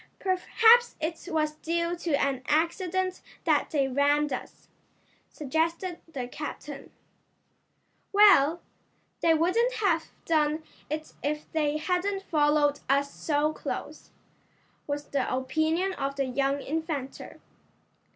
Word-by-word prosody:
"Perhaps 450 +5 +4
it 320 +2 -4
was 305 -1 +1
due 335 +2 -1
to 340 -3 -1
an 275 -2 0
accident 365 +4 0 0.2
that - - +2
they 280 -3 +1
rammed 285 +2 +2
us," 255 - -8 0.6
suggested 330 +5 -2
the 255 -5 -4
captain. 295 +1 -7 1.2
"Well, 360 -6 +6 0.6
they 330 -1 +4
wouldn't 445 +10 +2
have 355 -8 +1 0.2
done 310 -1 +1 0.3
it 310 +1 -5
if 300 +1 -3
they 305 -1 0
hadn't 380 +4 -1
followed 295 -3 +2
us 280 +1 +2
so 300 0 0
close," - - -6 0.8
was 290 0 -3
the 275 -2 -1
opinion 315 +8 0
of 275 -4 -3
the 275 -1 0
young 275 +2 0
inventor. 305 -3 -4
310 Hz, 110 wpm, -28 LUFS, 285-345 Hz, 1.2 s, Well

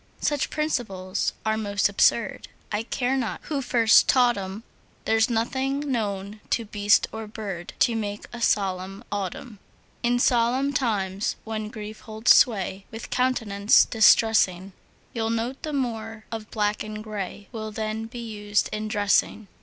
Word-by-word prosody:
Such 290 -2 0
principles 215 -12 -2
are 220 0 +1
most 200 -2 +1
absurd, 200 +2 +2 0.2
I 210 0 0
care 250 +3 -1
not 250 -5 -2
who 290 -3 -2
first 235 -3 +5
taught 245 -2 +5
'em; 195 +2 -6 0.4
There's 225 +1 +3
nothing 260 +4 0
known 205 -3 -3
to 230 - 0
beast 205 0 +3
or 220 -1 -6
bird 200 -5 -6
To 235 - +4
make 205 -2 -4
a 240 - -7
solemn 195 -1 0
autumn. 205 +3 -5 0.4
In 240 0 +2
solemn 250 +3 +2
times, 200 -6 -1
when 215 -1 -4
grief 215 -1 -8
holds 220 +1 +3
sway 195 -4 +2
With 225 +1 -9
countenance 225 -5 +3
distressing, 215 -4 +4 0.4
You'll 225 -1 -1
note 230 +4 -2
the 310 - -4
more 225 -5 -3
of 225 -1 -6
black 210 -1 -1
and 215 0 -6
gray 205 -2 -6
Will 220 -2 -5
then 220 +1 -3
be 235 0 -7
used 205 -1 -1
in 215 0 -3
dressing. 205 0 +1
220 Hz, 145 wpm, -25 LUFS, 205-235 Hz, 0.4 s, first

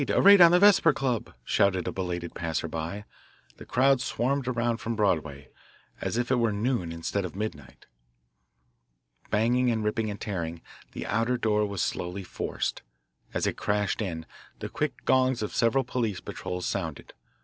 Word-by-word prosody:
A - - +3
raid 200 -1 +8
on 170 - +10
the 175 - +5
Vesper 190 -5 +6
Club!" 130 -6 -2
shouted 95 +3 +2
a - - -1
belated 90 -2 -4
passer 80 -1 -2
by. 85 +6 -5 0.5
The - - -12
crowd 135 0 +3
swarmed 130 +2 -1
around 120 -2 0
from 115 0 -3
Broadway, 80 -9 -1 0.5
as - - -2
if 120 +1 -1
it 130 - +4
were 115 -2 +2
noon 105 -4 -1
instead 85 +4 -2
of 90 - -6
midnight. 75 - -6 1.4
Banging 120 +4 +2
and 110 -2 0
ripping 110 +1 -1
and 100 0 -6
tearing, 85 -5 -4 0.3
the - - -5
outer 115 +3 0
door 105 -2 +1
was 100 -3 -2
slowly 90 +3 -3
forced. - - -3 0.5
As - - -1
it - - -1
crashed 105 +1 0
in, 80 -6 -4 0.3
the - - -6
quick - - -3
gongs 130 -3 +3
of 105 - -4
several 130 +3 +2
police 115 -8 -2
patrols 90 -1 -5
sounded. 80 -7 -4
105 Hz, 165 wpm, -27 LUFS, 90-125 Hz, 1.4 s, on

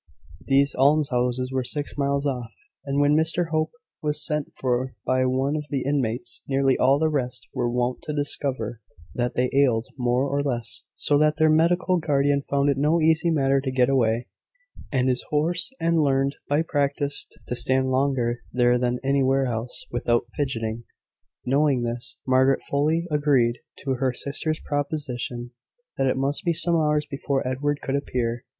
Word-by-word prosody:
These 140 +1 +3
almshouses 130 -3 +2
were 130 -1 -1
six 145 +4 -3
miles 140 0 0
off; 125 -4 -2 0.4
and 140 0 -1
when 145 +1 +4
Mr 160 +2 +1
Hope 155 0 0 0.3
was 150 0 +1
sent 150 -3 -2
for 130 0 -1
by 130 0 +2
one 135 +3 0
of 150 -1 -3
the 140 -2 -1
inmates, 130 -4 -2
nearly 135 -1 +2
all 135 +2 +4
the 160 +2 +2
rest 135 -5 -2
were 120 -1 0
wont 125 +1 -1
to - - -5
discover 130 -5 -2 0.3
that 120 0 -2
they 125 0 +1
ailed 125 -4 +2
more 125 +2 +1
or 140 +1 0
less; 120 -5 -3
so 145 -1 +2
that 150 0 +3
their 155 -1 +4
medical 175 +3 +3
guardian 145 -2 +1
found 140 0 0
it 135 - -2
no 155 +4 +3
easy 160 +1 +3
matter 135 -3 +2
to 135 - -3
get 130 0 +2
away, 120 -3 +2 0.7
and 130 -3 +1
his 125 -1 +1
horse 170 - 0
had 170 0 +1
learned, 140 -2 +2
by 145 +3 +2
practice, 145 -2 -1 0.2
to 125 - -2
stand 130 +2 +2
longer 130 -3 +1
there 120 0 +3
than 125 0 0
anywhere 135 0 +2
else 120 0 -3
without 120 0 +1
fidgeting. 115 -5 -2 0.6
Knowing 135 -1 +2
this, 120 +1 -4
Margaret 130 +1 +3
fully 155 +4 +1
agreed 135 -5 +2 0.2
to 135 - -2
her 130 -2 +1
sister's 155 +4 -2
proposition, 135 -5 -3 0.5
that 135 - +1
it 130 - +1
must 140 +2 -1
be 170 - +1
some 170 +2 +1
hours 150 -2 +2
before 140 -2 -2
Edward 145 +3 -1
could 135 - -2
appear. 120 -3 -2
135 Hz, 170 wpm, -24 LUFS, 125-145 Hz, 0.7 s, when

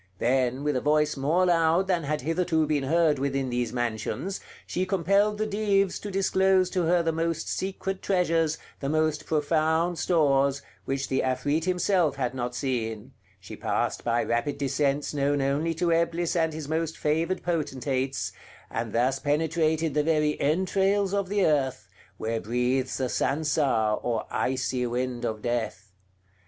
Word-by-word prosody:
Then, 130 +3 +1
with 150 -1 0
a 125 - 0
voice 150 0 +2
more 155 +7 +2
loud 170 +1 +3
than 180 -4 0
had 150 +1 -1
hitherto 165 +1 +1
been 145 -2 0
heard 160 -1 +2
within 135 -1 -1
these 120 -2 -1
mansions, 120 - -3 0.3
she 180 - -2
compelled 200 +3 +2
the 215 - 0
Dives 200 -2 +1
to 205 - -6
disclose 190 -1 +2
to 180 -3 0
her 175 +1 +3
the 165 - +1
most 165 0 -2
secret 190 0 -3
treasures, 165 -4 +1 0.2
the 135 - -3
most 155 0 0
profound 160 +2 +1
stores, 140 -5 +2 0.2
which 135 0 -2
the 130 - 0
Afrit 145 +5 0
himself 180 -3 +2
had 125 -2 -2
not 125 -1 -3
seen; 120 -2 -3 0.3
she 95 - -10
passed - - -1
by 120 0 +1
rapid 130 +5 -1
descents 140 +1 0
known 145 0 +1
only 145 +5 0
to 170 +1 +1
Eblis 170 +1 0
and 160 -1 +2
his 155 -2 -6
most 160 +1 -2
favored 165 +5 0
potentates, 135 -5 -2 0.4
and - - -3
thus 130 +3 +1
penetrated 160 +1 +1
the 150 - +2
very 150 -1 +1
entrails 190 +5 +1
of 200 -2 0
the 205 -1 +2
earth, 130 -8 0 0.3
where 115 +1 -2
breathes 125 +3 0
the 130 - 0
Sansar, 140 -7 +1
or 115 -2 -1
icy 125 -1 -1
wind 125 0 -2
of 110 -1 -3
death. 110 -5 -3
150 Hz, 155 wpm, -27 LUFS, 130-170 Hz, 0.4 s, loud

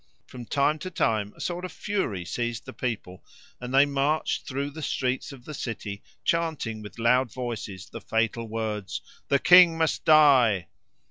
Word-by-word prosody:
From 125 -2 -10
time 145 +2 +1
to 185 - -5
time 110 - 0
a - - -17
sort 175 0 -3
of 185 - -5
fury 150 - -3
seized 120 +3 -3
the - - -9
people, 105 -7 -5 0.4
and 125 0 -6
they 135 +2 +6
marched 145 +2 -1
through 140 +2 -3
the 160 +2 -8
streets 130 -1 -2
of 130 -3 -13
the 155 - -7
city 110 -6 -5 0.2
chanting 160 -10 -1
with 105 - -11
loud 120 +1 +2
voices 110 -6 -6
the - - -9
fatal 115 +1 -1
words, 110 -3 -4 0.3
"The 140 - +3
king 175 +2 +7
must 160 -2 0
die!" 130 - +5
125 Hz, 165 wpm, -26 LUFS, 110-150 Hz, 0.4 s, king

